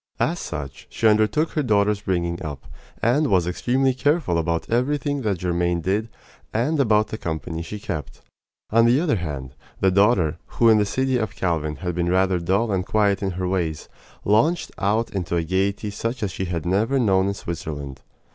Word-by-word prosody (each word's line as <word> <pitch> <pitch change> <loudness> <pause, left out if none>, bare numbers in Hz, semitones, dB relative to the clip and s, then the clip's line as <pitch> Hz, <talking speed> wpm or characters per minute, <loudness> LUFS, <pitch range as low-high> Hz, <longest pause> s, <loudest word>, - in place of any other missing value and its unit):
As - - 0
such, 70 -2 -6
she 115 - +1
undertook 110 +9 +3
her 155 - 0
daughter's 105 -4 +2
bringing 85 -3 -1
up, 75 -3 -6 0.4
and 140 +7 +3
was 90 -7 +3
extremely 130 +9 +1
careful 140 - +1
about 85 0 -1
everything 145 +4 0
that 100 -7 -1
Germaine 85 -1 0
did 100 +6 -1 0.4
and 135 +8 0
about 110 -5 +3
the 110 - -5
company 80 0 -4
she 95 +6 -6
kept. 75 -8 -6 0.5
On 115 +1 +5
the 125 +4 +4
other 155 -9 +1
hand, 70 -7 -5 0.3
the 95 - +3
daughter, 100 -5 +3 0.2
who 115 - +5
in 110 -1 +6
the 105 - +1
city 130 +3 0
of 110 -4 -3
Calvin 80 -4 -1
had 90 +5 -4
been 85 0 -1
rather 95 0 +2
dull 100 +6 +1
and 95 -2 0
quiet 100 0 +1
in 100 - 0
her 90 -1 -1
ways, 85 -5 -2 0.4
launched 145 - +2
out 105 +4 +1
into 90 -3 -2
a 85 - +1
gaiety 95 +4 -1
such 115 +4 -3
as 100 - -1
she 95 - -3
had 85 -3 -3
never 105 +9 +1
known 95 -6 +3
in 100 - -1
Switzerland. 70 -7 -6
100 Hz, 185 wpm, -23 LUFS, 85-115 Hz, 0.5 s, in